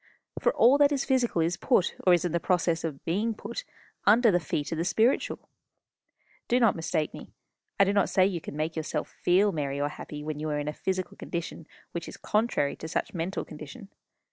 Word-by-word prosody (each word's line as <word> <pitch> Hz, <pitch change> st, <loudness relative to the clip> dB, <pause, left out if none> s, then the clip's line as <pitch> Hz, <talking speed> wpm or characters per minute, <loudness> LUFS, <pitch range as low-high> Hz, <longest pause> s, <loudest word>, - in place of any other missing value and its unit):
For -, -, +3 dB
all 260 Hz, +5 st, +6 dB
that 285 Hz, 0 st, +5 dB
is 275 Hz, -2 st, 0 dB
physical 250 Hz, -10 st, +1 dB
is 170 Hz, +2 st, 0 dB
put, 240 Hz, -8 st, +2 dB
or -, -, +8 dB
is 175 Hz, -1 st, +4 dB
in 175 Hz, -, -1 dB
the 170 Hz, -, +1 dB
process 170 Hz, -2 st, +1 dB
of 155 Hz, -4 st, -5 dB
being 210 Hz, +7 st, 0 dB
put, -, -, -6 dB, 0.4 s
under 225 Hz, +2 st, +6 dB
the 175 Hz, -, +3 dB
feet 150 Hz, -1 st, -3 dB
of 165 Hz, -, -2 dB
the -, -, +1 dB
spiritual. 225 Hz, +7 st, +1 dB, 1.0 s
Do 245 Hz, -, +3 dB
not 230 Hz, -4 st, +4 dB
mistake 160 Hz, -2 st, -1 dB
me. -, -, -10 dB, 0.5 s
I -, -, +8 dB
do 200 Hz, +1 st, +2 dB
not 200 Hz, -1 st, +2 dB
say 185 Hz, -, +4 dB
you 185 Hz, -4 st, -1 dB
can 145 Hz, -, -8 dB
make 155 Hz, +1 st, -2 dB
yourself 155 Hz, -2 st, -3 dB
feel 195 Hz, +4 st, +4 dB
merry 140 Hz, -4 st, -2 dB
or 145 Hz, 0 st, 0 dB
happy 150 Hz, 0 st, -8 dB
when 155 Hz, -1 st, -4 dB
you 155 Hz, +1 st, -3 dB
are 150 Hz, -, -1 dB
in 145 Hz, 0 st, -3 dB
a 150 Hz, -, -2 dB
physical 185 Hz, +1 st, -3 dB
condition 170 Hz, -1 st, -5 dB, 0.2 s
which 170 Hz, -1 st, -5 dB
is -, -, -9 dB
contrary 210 Hz, -10 st, 0 dB
to 160 Hz, -, -7 dB
such -, -, -2 dB
mental 175 Hz, +2 st, -3 dB
condition. 155 Hz, +5 st, -10 dB
175 Hz, 215 wpm, -28 LUFS, 155-205 Hz, 1.0 s, or